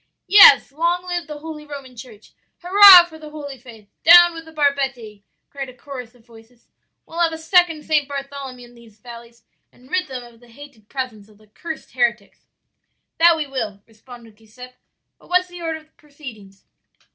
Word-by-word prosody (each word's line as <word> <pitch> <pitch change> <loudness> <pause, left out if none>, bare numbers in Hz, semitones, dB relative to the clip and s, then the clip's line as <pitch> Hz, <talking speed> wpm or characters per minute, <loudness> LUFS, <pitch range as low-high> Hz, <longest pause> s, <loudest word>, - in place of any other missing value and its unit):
"'Yes; 390 -9 +7
long 340 +4 -2
live 350 -2 -5
the 300 -1 -8
holy 305 0 -10
Roman 280 -4 -11
Church! 225 -3 -15 0.3
Hurrah 375 -1 +8
for 320 -2 -15
the 305 -1 -11
holy 285 -3 -10
faith! 225 -4 -16 0.2
Down 345 +1 +7
with 330 0 -10
the 320 - -15
barbetti!' 270 -8 -3 0.3
cried 275 -2 -7
a 255 - -15
chorus 250 -3 -11
of 230 -2 -25
voices. 230 0 -21 0.4
'We'll 335 - -9
have 335 -1 +1
a - - -6
second 325 -1 +1
St. 300 -3 0
Bartholomew 275 -3 -9
in - - -21
these 230 -3 -20
valleys 235 -1 -14 0.3
and 255 +2 -23
rid 365 -2 -1
them 255 -3 -8
of 235 -1 -18
the 240 - -21
hated 235 -3 -17
presence 235 -6 -7
of 210 - -22
the 215 - -24
cursed 315 +10 -10
heretics.' 235 -5 -3 0.7
"'That 335 0 +5
we 310 - -3
will,' 220 -8 -6
responded 230 -1 -17
Giuseppe. 250 +4 -15 0.5
'But - - -22
what's 360 0 +1
the 355 0 -12
order 325 -1 -4
of 310 0 -31
proceedings?' 245 -10 -14
275 Hz, 180 wpm, -19 LUFS, 235-320 Hz, 0.7 s, Hurrah